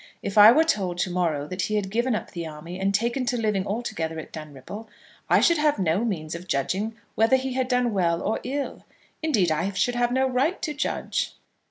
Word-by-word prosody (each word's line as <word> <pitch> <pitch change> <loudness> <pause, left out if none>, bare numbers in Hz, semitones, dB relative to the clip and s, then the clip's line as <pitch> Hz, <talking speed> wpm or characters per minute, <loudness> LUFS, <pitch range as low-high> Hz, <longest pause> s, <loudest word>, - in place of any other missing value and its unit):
If 200 - -4
I 210 +1 +10
were 310 +6 +5
told 195 - 0
to 180 - -1
morrow 165 -5 0
that 185 +2 -3
he 215 - -1
had 195 -2 -1
given 235 +2 +1
up - - -5
the 170 -2 -5
army 165 +4 -8
and 195 +1 +1
taken 235 +6 0
to 245 - +1
living 210 -4 0
altogether 165 -7 -3
at 160 - -8
Dunripple, 155 - -8 0.4
I - - +5
should 340 -2 +4
have 300 -3 +3
no 185 +2 +1
means 165 -9 -3
of 170 +2 -7
judging 195 +10 -1 0.2
whether 225 +4 +4
he 260 0 -1
had 260 0 0
done 250 -2 +1
well 170 -3 +1
or 215 - -1
ill. 275 +3 -4 0.4
Indeed, 215 - +2
I 165 +6 0
should 245 +6 +1
have 240 0 +1
no 265 +1 +2
right 265 +8 +1
to 310 -3 -1
judge." 290 - -2
210 Hz, 215 wpm, -25 LUFS, 175-250 Hz, 0.4 s, I